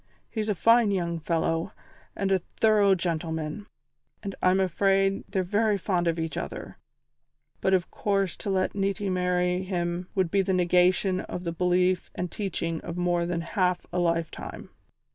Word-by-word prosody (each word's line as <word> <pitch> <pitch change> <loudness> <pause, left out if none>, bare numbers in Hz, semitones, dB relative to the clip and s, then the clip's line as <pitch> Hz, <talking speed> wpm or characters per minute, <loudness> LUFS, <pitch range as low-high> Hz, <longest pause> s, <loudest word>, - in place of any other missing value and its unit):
He's 220 -1 -2
a 210 - +1
fine 230 +4 +5
young 170 -4 -1
fellow 165 0 -1 0.4
and 195 -1 -1
a 190 -2 +3 0.2
thorough 210 -3 +5
gentleman, 165 +1 -3 0.6
and 200 -1 -4
I'm 185 +1 +4
afraid 195 +1 +2
they're 190 -1 0
very 210 +3 +1
fond 180 -2 0
of 165 0 +1
each 160 -2 -3
other, - - -6 0.8
but 190 - +3
of 180 -1 -1
course 195 -3 0
to - - -5
let 190 -1 +1
Niti 200 0 -1
marry 180 0 +1
him 175 -1 -2
would 185 -4 +1
be 200 - +3
the 190 0 0
negation 180 +1 +3
of 180 - -6
the 170 - -2
belief 180 +1 +1
and 180 -1 -3
teaching 170 -5 -3
of 170 - -6
more 175 -1 +1
than 170 -1 -1
half 180 +1 0
a 180 - +1
lifetime. 170 -2 -2
180 Hz, 160 wpm, -27 LUFS, 175-195 Hz, 0.8 s, fine